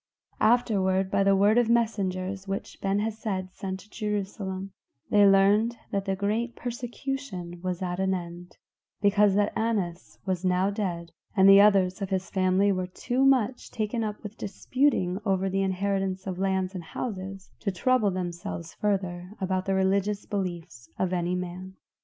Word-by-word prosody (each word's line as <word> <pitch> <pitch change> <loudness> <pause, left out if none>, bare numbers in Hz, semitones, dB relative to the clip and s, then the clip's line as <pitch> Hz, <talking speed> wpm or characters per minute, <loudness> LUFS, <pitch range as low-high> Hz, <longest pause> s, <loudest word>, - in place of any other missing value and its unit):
Afterward, 195 -5 +2
by - - +2
the 195 0 +4
word 205 +4 +4
of 235 -2 +2
messengers 195 -4 0
which 195 0 -5
Ben 195 +1 +1
Hesed 205 -3 -3
sent 190 -1 -5
to 205 - -19
Jerusalem, 195 -2 -3 0.4
they 205 -1 +6
learned 205 +4 +4
that 200 -1 -1
the 195 -1 0
great 215 +5 -1
persecution 240 -7 -5
was 185 0 -3
at 180 0 -3
an 190 0 +1
end, 175 0 -8 0.4
because 205 -1 +4
that 205 0 +2
Annas 200 -7 -2
was 185 -2 -1
now 185 +2 +2
dead, 175 -5 -3 0.3
and 190 0 +7
the 195 0 +9
others 195 -2 +4
of 195 - -2
his 190 -1 -2
family 190 +1 +3
were 185 -1 -1
too 245 +8 -1
much 260 -3 +2
taken 225 +1 -2
up 210 0 -4
with 210 0 -8
disputing 200 -3 0
over 195 -2 0
the 195 +1 +1
inheritance 195 0 -1
of 185 -2 -4
lands 190 -1 0
and 180 -3 -6
houses, 195 0 -6
to 200 - -1
trouble 225 +3 +2
themselves 175 -2 -5
further 185 -2 -2
about 185 0 -1
the 195 - +2
religious 195 +2 +1
beliefs 170 - -5
of 185 -1 0
any 175 0 0
man. 180 +1 -6
195 Hz, 160 wpm, -27 LUFS, 185-210 Hz, 0.4 s, the